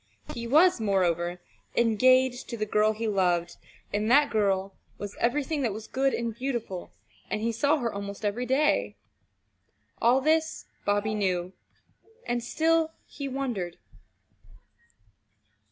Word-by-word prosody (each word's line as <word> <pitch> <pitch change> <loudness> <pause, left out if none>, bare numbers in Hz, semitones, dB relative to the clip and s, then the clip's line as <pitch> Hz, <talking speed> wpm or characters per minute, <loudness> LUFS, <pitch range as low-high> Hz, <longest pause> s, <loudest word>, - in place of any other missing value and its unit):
He 235 0 -5
was, 315 +2 +5
moreover, 175 -4 +1 0.4
engaged 255 +2 +3
to 235 - -4
the 215 - -1
girl 215 +1 +2
he 225 +1 -3
loved, 175 -4 +1 0.4
and 210 +2 0
that 290 +4 +5
girl 195 -3 +1 0.2
was 205 0 -6
everything 290 +4 0
that 235 -6 0
was 215 +1 -7
good 270 +3 +1
and 235 -2 -2
beautiful, 235 -7 -4 0.4
and 215 - -1
he 230 +2 0
saw 285 +7 +2
her 240 -5 -2
almost 200 +1 -6
every 235 +5 -1
day. 280 +4 +2 1.1
All 245 +3 +5
this 315 +3 +1 0.2
Bobby 205 +1 +1
knew 185 -3 -1 0.7
and 240 -1 -1
still 320 +4 +1
he 280 -1 -6
wondered. 245 -10 -3
230 Hz, 130 wpm, -27 LUFS, 200-265 Hz, 1.1 s, was